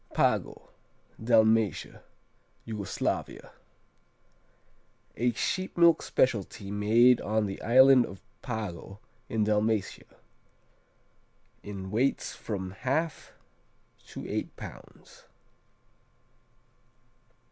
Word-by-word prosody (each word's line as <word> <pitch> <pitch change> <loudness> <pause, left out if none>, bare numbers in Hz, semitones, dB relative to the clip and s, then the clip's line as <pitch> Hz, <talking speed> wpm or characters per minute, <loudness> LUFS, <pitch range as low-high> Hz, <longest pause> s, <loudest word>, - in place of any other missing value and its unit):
Pago - - 0 0.5
Dalmatia, 110 -2 +2 0.6
Yugoslavia 105 -4 -4 1.6
A 120 +2 +1
sheep 185 - -3
milk 170 -2 +5
specialty 100 -4 -1
made 115 +4 +4
on 110 +1 0
the 95 -1 -6
island 130 +1 +6
of 95 0 -11 0.2
Pago 105 -5 -6 0.3
in 110 -1 0
Dalmatia, 105 0 -1 1.5
in 95 -2 -7
weights 125 +6 0
from 95 -4 -5
1/2 155 +4 -1 0.8
to - - -8
eight - - -4
pounds. - - -13
110 Hz, 75 wpm, -28 LUFS, 105-125 Hz, 1.6 s, island